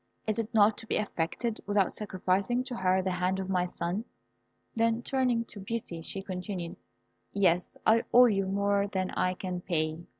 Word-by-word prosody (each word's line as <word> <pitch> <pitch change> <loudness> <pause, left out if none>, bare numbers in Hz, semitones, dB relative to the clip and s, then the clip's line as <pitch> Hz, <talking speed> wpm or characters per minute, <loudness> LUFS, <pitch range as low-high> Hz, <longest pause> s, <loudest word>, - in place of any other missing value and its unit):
Is 215 0 0
it 225 0 -3
not 215 -2 +4
to 225 - -8
be - - 0
effected 210 +4 -2
without 205 -2 +2
sacrificing 200 +4 0
to 255 -1 -5
her 185 0 +2
the 190 - 0
hand 180 +1 0
of 190 0 -3
my 180 -1 +1
son?" 175 +4 -3 0.7
Then 230 +1 +1
turning 250 -3 +1
to 215 - -11
Beauty, 195 -4 -4
she 195 +4 -5
continued, 180 -2 -5 0.6
"Yes, 180 -3 +2
I 225 +1 +4
owe 250 +1 +8
you 195 -5 +2
more 200 +1 +1
than 190 -2 -2
I 185 0 0
can 180 -1 -4
pay. 155 -3 -1
195 Hz, 175 wpm, -29 LUFS, 185-225 Hz, 0.7 s, owe